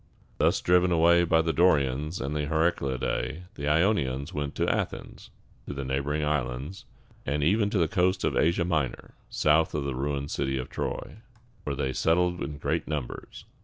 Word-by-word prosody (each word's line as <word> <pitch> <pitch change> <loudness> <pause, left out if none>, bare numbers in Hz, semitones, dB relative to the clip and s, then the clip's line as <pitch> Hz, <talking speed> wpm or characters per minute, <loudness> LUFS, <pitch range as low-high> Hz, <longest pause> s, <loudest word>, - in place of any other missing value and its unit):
Thus - - +3
driven 90 0 +3
away 85 +1 +5
by 80 -1 +3
the 80 0 0
Dorians 75 -1 +2
and 70 +2 -3
the 75 -1 -1
Heraclidæ, 80 0 -1
these 70 - -5
Ionians 75 -3 +1
went 75 -2 -3
to - - 0
Athens, - - -3 0.4
to 70 - -5
the 70 -1 -4
neighboring 70 +3 -1
islands, 75 +3 -3 0.4
and 70 +2 -1
even 100 +6 +3
to 105 - -1
the 85 -3 +3
coast 90 +3 +1
of - - 0
Asia 85 +2 +2
Minor, 75 -8 -2 0.2
south 75 +1 +2
of 75 - -1
the 70 -1 -2
ruined 70 +2 -3
city 65 0 -1
of 65 - -5
Troy, - - -4 0.5
where 70 - -2
they 65 -1 -2
settled 90 +3 +1
in 75 - -4
great - - -2
numbers. 75 -6 -6
75 Hz, 170 wpm, -27 LUFS, 70-85 Hz, 0.5 s, away